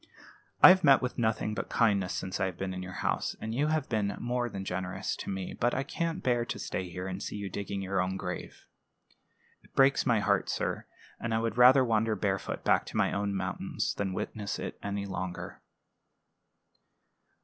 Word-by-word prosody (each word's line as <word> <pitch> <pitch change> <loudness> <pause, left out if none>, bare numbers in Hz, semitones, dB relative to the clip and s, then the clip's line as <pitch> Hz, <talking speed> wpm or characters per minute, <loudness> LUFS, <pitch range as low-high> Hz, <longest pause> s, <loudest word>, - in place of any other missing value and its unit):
"I - - +13
have 185 0 +6
met 140 -3 +7
with 125 - -3
nothing 110 -2 0
but - - -4
kindness 100 -6 +2
since 95 0 -3
I 95 - +2
have 95 - -6
been 95 -1 -3
in 90 - -5
your 90 0 -6
house, - - 0
and 110 +1 -4
you 140 +5 +1
have 155 0 0
been 105 -3 -1
more 120 0 -1
than 95 -2 -6
generous 95 +1 -3
to - - -6
me; 95 -2 -4
but 120 +1 0
I 130 - 0
can't 165 +2 -3
bear 120 -2 +2
to - - -4
stay 90 -1 -4
here 90 +1 -6
and 95 -1 -4
see - - -5
you 100 -2 -5
digging 100 0 -4
your 95 0 0
own 95 +1 -2
grave. 90 -2 -6 1.0
It - - -25
breaks 135 0 +5
my 120 -4 +3
heart, 100 -1 +1
sir; - - -2 0.3
and 115 -1 -1
I - - +2
would 115 -1 -1
rather 130 +2 +7
wander 110 -1 +1
barefoot 95 -1 -2
back - - +3
to - - -5
my - - +2
own 100 0 -1
mountains - - -2
than 95 -2 -2
witness 100 +1 -3
it - - -6
longer." 95 -3 -4
100 Hz, 195 wpm, -30 LUFS, 95-120 Hz, 1.0 s, I